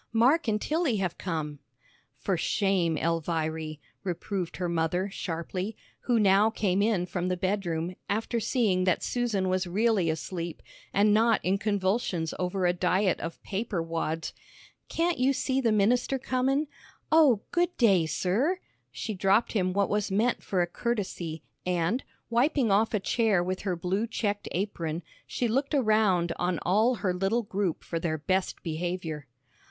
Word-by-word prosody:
"Mark 255 +7 +4
and 210 -1 +1
Tilly 310 -1 0
have 185 -3 -2
come!" 155 -5 -3 0.6
"For 180 +9 -1
shame, 175 -2 +1
Elviry," 160 -1 -1 0.2
reproved 185 0 -3
her 180 - -1
mother, 170 +3 0
sharply, 180 +4 -4 0.3
who 240 -2 +3
now 200 +1 +5
came 200 -3 0
in 205 -4 +2
from 180 0 -3
the 180 0 0
bedroom, 180 -3 -1
after 225 +3 0
seeing 210 -6 +1
that 185 - +1
Susan 225 -6 0
was 185 0 0
really 200 -1 +2
asleep, 170 +1 -4 0.3
and 205 +1 +4
not 225 +1 +4
in 190 +2 +2
convulsions 195 -4 0
over 180 +1 0
a 175 - +3
diet 185 +1 +1
of 165 - -5
paper 205 -1 -2
wads. 165 -1 -3 0.6
"Can't 335 -2 0
you 265 +2 +3
see 265 0 0
the 230 -3 +2
minister 235 +6 +2
comin'? 265 +3 0 0.5
Oh, 295 -9 +5
good 350 +1 +1
day, 195 -9 +4
sir!" 235 - +1 0.3
She 220 - -4
dropped 195 +4 +2
him 185 -4 +1
what 200 +1 +1
was 210 0 0
meant 220 +6 +1
for 185 -3 0
a - - +1
courtesy, 175 -6 -3 0.2
and, 180 +7 0 0.2
wiping 245 0 +2
off 215 +3 +3
a - - +2
chair 205 -2 +2
with 185 +1 -3
her 190 -3 -1
blue 190 +6 -1
checked 205 -2 -2
apron, 170 -4 -2 0.2
she 245 - -1
looked 270 +6 0
around 215 -8 +3
on 175 -1 0
all 220 +7 +3
her 185 -5 -1
little 195 +6 0
group 200 -5 -2
for 165 - -3
their 165 -2 -1
best 185 +5 -1
behavior. 165 -2 -3
195 Hz, 155 wpm, -28 LUFS, 175-225 Hz, 0.6 s, now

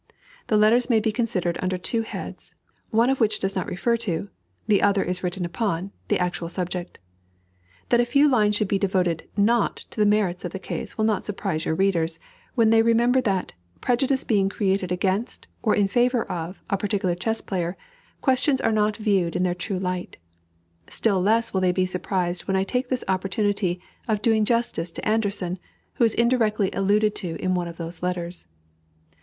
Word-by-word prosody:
The 215 - +3
letters 230 +4 +4
may 230 -3 +4
be 220 0 0
considered 190 -7 -1
under 185 0 -1
two 225 +6 0
heads, 225 - -8 0.3
one 230 +4 +3
of 270 - -1
which 220 -3 +3
does 195 0 -2
not 185 - -2
refer 235 +6 0
to, 200 -3 -2 0.4
the 210 -3 +3
other 200 -1 +3
is 180 0 -3
written 180 0 -2
upon, 190 0 -2 0.2
the - - +2
actual 175 -1 -2
subject. 180 0 -4 0.9
That 240 - +4
a 240 - +4
few 280 +5 +4
lines 210 -6 +3
should 205 0 +1
be 195 0 +1
devoted 185 -4 0
not 230 +4 +3 0.2
to - - -9
the 210 - +5
merits 205 -4 +1
of 175 - -5
the - - -3
case 190 - -6
will 215 - +2
not 215 -3 +1
surprise 160 -6 -3
your 160 - 0
readers, 170 -3 +1 0.4
when 225 -3 +4
they 225 0 +6
remember 235 +3 +3
that, 195 -6 -1 0.3
prejudice 260 +2 +1
being 200 -4 +2
created 195 -3 0
against, 190 +5 -1 0.2
or 215 - +2
in 205 -1 +3
favor 240 +3 +2
of, 170 +2 -6
a 200 - 0
particular 195 -3 0
chess 225 +6 -1
player, 180 -1 -3 0.4
questions 265 0 +2
are - - +1
not 210 -1 +1
viewed 195 -6 +1
in - - +1
their 180 -1 +1
true 185 +2 -4
light; 180 -1 -3 0.7
still 200 -5 +1
less 225 +4 +2
will 190 - +1
they 185 -1 +3
be 185 +1 +1
surprised 180 -1 -2
when 190 -1 +1
I 190 - +2
take 250 +6 -1
this 255 -1 -1
opportunity 190 0 0 0.3
of 215 -2 0
doing 220 -2 +3
justice 230 -8 0
to - - -5
Anderssen, 200 -4 -1 0.3
who 250 - 0
is 225 -2 +3
indirectly 225 -4 +2
alluded 205 +2 +2
to 175 -5 -3
in 185 +2 -1
one 175 -1 -1
of 170 -1 -8
the 170 0 -6
letters. 175 - -4
200 Hz, 190 wpm, -24 LUFS, 180-225 Hz, 0.9 s, they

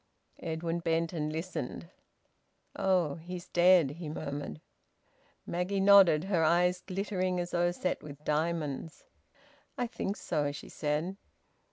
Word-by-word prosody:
Edwin 165 +1 -2
bent 165 0 0
and 155 -2 -2
listened. 165 +4 -5 0.8
"Oh! 180 -6 +1
He's 175 +2 -8
dead!" 175 -5 +5
he 165 -4 -5
murmured. 145 - -5 0.9
Maggie 180 +3 -1
nodded, 195 -5 +7
her 185 -4 +1
eyes 180 +2 +3
glittering 185 -1 -2
as 175 0 -3
though 175 0 +2
set 180 +1 -2
with 150 0 -11
diamonds. 155 -1 -2 0.7
"I 245 - 0
think 215 -4 -3
so," 145 -1 -1
she 145 - -9
said. 155 +6 -2
170 Hz, 125 wpm, -31 LUFS, 155-185 Hz, 0.9 s, nodded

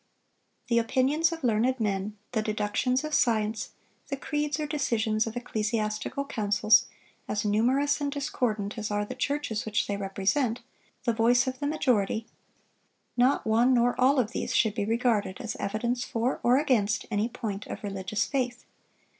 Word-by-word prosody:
The 235 -1 +3
opinions 270 +8 +2
of 325 -3 -6
learned 245 +2 +2
men, 205 -1 -2
the 225 -3 0
deductions 215 +5 0
of 305 0 -4
science, 220 -3 +1 0.4
the 275 - -3
creeds 295 +2 -2
or 305 - -1
decisions 230 -7 0
of 225 +2 -5
ecclesiastical 215 +2 -2
councils, 215 -3 +3 0.4
as 210 +1 -2
numerous 260 +8 +2
and 285 -1 -1
discordant 225 -7 -2
as 210 - -3
are 205 0 0
the - - -6
churches 285 -7 -2
which 215 -1 0
they 200 - -2
represent, 200 +6 0 0.4
the 235 -1 +1
voice 235 +3 +4
of 260 -1 -4
the 285 - -1
majority,—not 245 0 -2
one 235 +4 +4
nor 240 0 +3
all 270 +3 +5
of 230 -2 0
these - - -3
should 220 -3 +3
be 205 -2 -1
regarded 225 -4 0
as 225 - -4
evidence 235 +5 -1
for 240 +2 -1
or 245 +2 +4
against 240 -8 +1
any 210 +2 0
point 205 -4 -5
of - - -7
religious 195 +1 -2
faith. 250 -3 -2
230 Hz, 155 wpm, -28 LUFS, 210-260 Hz, 0.4 s, all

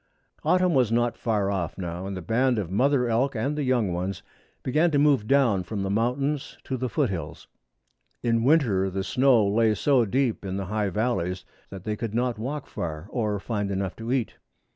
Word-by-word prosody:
Autumn 180 -1 +3
was 125 -5 +3
not 120 0 +1
far 105 -4 0
off 90 -4 -3
now, 90 0 -5
and 100 -1 -4
the 90 - -6
band 120 +6 +2
of 95 -5 -3
mother 125 +4 +2
elk 125 +4 +1
and 135 +7 -1
young 125 -9 +1
ones 90 +2 -3 0.4
began 155 +7 +2
to 150 - +1
move 140 -7 +3
down 130 -8 +3
from 100 +2 -4
the 95 - -2
mountains 130 +7 -1
to 130 - -3
the 130 0 -2
foot 140 -7 0
hills. 90 -3 -6 0.8
In 115 -1 +2
winter 120 -10 +3
the 95 +1 -3
snow 125 -2 +3
lay 110 +1 +3
so 130 0 +3
deep 125 +1 0
in 95 -1 -3
the 100 - -3
high 105 +1 -1
valleys 95 -4 -1 0.2
that 95 -2 -9
they 105 +1 -2
could 110 0 -4
not 120 -2 0
walk 140 +5 -4
far 80 -1 -5
or 105 -4 -1
find 105 -1 -2
enough 95 -2 -2
to 115 +1 -5
eat. 130 -4 -1
115 Hz, 195 wpm, -26 LUFS, 100-130 Hz, 0.8 s, Autumn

